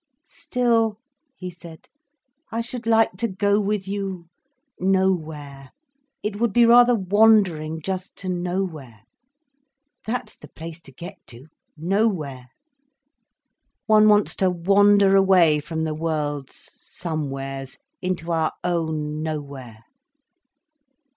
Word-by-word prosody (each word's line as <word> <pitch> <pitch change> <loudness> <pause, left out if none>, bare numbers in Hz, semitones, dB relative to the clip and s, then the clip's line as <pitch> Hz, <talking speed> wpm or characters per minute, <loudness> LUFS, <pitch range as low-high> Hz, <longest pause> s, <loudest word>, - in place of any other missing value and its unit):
"Still," 230 -3 0 0.4
he 185 -6 -7
said, 170 -2 -14 0.6
"I 230 +1 -1
should 235 0 -6
like 225 -4 +3
to 230 - -1
go 200 +1 +1
with 205 -1 -2
you—nowhere. 185 - -3 0.5
It 210 -1 -3
would 235 -1 +1
be 235 +3 +5
rather 240 +1 +6
wandering 190 -6 +3
just 190 +1 -4
to 190 - -8
nowhere. 175 - -4 1.1
That's 235 -1 -3
the - - -14
place 165 0 -10
to - - -13
get 175 +9 -10
to—nowhere. 155 - -3 1.4
One 215 -1 +5
wants 210 0 +3
to 190 - +2
wander 195 +2 +4
away 185 -6 +5
from 160 +2 -4
the 155 -1 -2
world's 150 -3 -4
somewheres, 135 -4 -5 0.2
into 175 -2 -3
our 160 -1 0
own 160 -3 -2
nowhere." 140 -7 -6
180 Hz, 105 wpm, -23 LUFS, 155-205 Hz, 1.4 s, rather